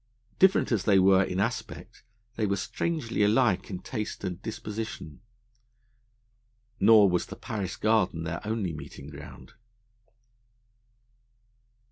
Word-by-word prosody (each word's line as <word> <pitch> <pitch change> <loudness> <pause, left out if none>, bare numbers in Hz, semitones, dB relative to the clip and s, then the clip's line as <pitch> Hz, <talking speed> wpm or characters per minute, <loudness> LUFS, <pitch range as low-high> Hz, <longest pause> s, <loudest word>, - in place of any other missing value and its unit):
Different 190 -6 +4
as 110 -5 0
they 100 -2 +5
were 95 0 +5
in 90 0 -3
aspect, 110 +3 -4 0.3
they 110 -2 0
were 100 - +1
strangely 120 - -2
alike 105 -1 +2
in 95 - -4
taste 105 +3 -5
and 90 -1 -4
disposition. 105 -8 -6 1.6
Nor 105 -1 +7
was 90 -2 0
the - - -8
Paris 105 -8 -5
Garden 110 -7 +1
their 85 +1 -4
only 105 -5 -2
meeting 75 -1 -10
ground. 75 0 -12
100 Hz, 115 wpm, -27 LUFS, 90-110 Hz, 1.6 s, Nor